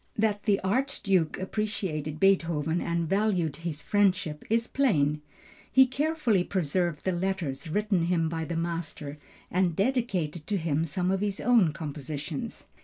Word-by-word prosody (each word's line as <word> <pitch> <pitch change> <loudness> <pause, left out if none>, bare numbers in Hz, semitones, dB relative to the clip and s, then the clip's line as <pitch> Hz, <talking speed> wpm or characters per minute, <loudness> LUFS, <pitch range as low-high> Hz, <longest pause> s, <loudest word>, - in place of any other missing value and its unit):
That 210 -1 +1
the 205 -3 +3
Archduke 195 - +1
appreciated 185 -7 -2
Beethoven 170 -4 +2
and 170 -1 -1
valued 190 -6 +1
his 165 -2 -5
friendship 190 -7 +1
is 230 +1 +2
plain. 150 - +1 0.5
He 265 0 +7
carefully 260 - +1
preserved 175 -3 -1
the 190 - +2
letters 175 -5 -2
written 200 -1 +1
him 170 -2 +2
by 160 0 -3
the 170 +1 -3
master 165 -3 -4 0.3
and 180 -2 +1
dedicated 195 - -1
to 205 - 0
him 160 -2 0
some 180 +4 -1
of 195 0 0
his 205 -1 -1
own 225 -9 +4
compositions. 150 0 -5
180 Hz, 140 wpm, -28 LUFS, 155-205 Hz, 0.5 s, He